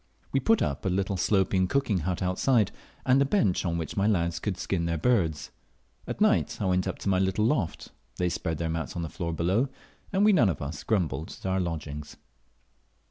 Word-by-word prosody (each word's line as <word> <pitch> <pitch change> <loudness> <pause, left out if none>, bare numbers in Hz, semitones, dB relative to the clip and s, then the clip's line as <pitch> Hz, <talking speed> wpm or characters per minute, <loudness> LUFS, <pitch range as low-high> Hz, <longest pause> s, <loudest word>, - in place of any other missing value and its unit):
We 135 - +2
put 225 +7 +3
up 70 - -2
a - - 0
little 95 +1 0
sloping 95 0 +2
cooking 110 -5 +1
but 90 0 -1
outside, 105 +4 +2 0.3
and 130 +2 +4
a - - +6
bench 135 - +1
on 85 -2 -1
which 80 -2 -4
my 100 +1 +2
lads 85 -5 +1
could 95 0 -2
skin 90 -1 -1
their 85 0 0
birds. 80 -6 +1 0.6
At - - -4
night - - +2
I 100 - -1
went 90 0 +1
up - - -3
to - - -2
my 95 -1 +3
little 95 +3 +1
loft, 115 - -1 0.2
they 90 - 0
spread 80 -2 -2
their 85 - -2
mats 80 0 -3
on 85 - -2
the 80 - -4
floor 85 +1 -4
below, 95 - +1 0.4
and 200 +1 +3
we 215 - +6
none 120 - +5
of 80 - -2
us 70 +1 -5
grumbled 90 -6 -1
at - - -14
our 95 0 +1
lodgings. 75 -4 -4
95 Hz, 210 wpm, -27 LUFS, 85-105 Hz, 0.6 s, a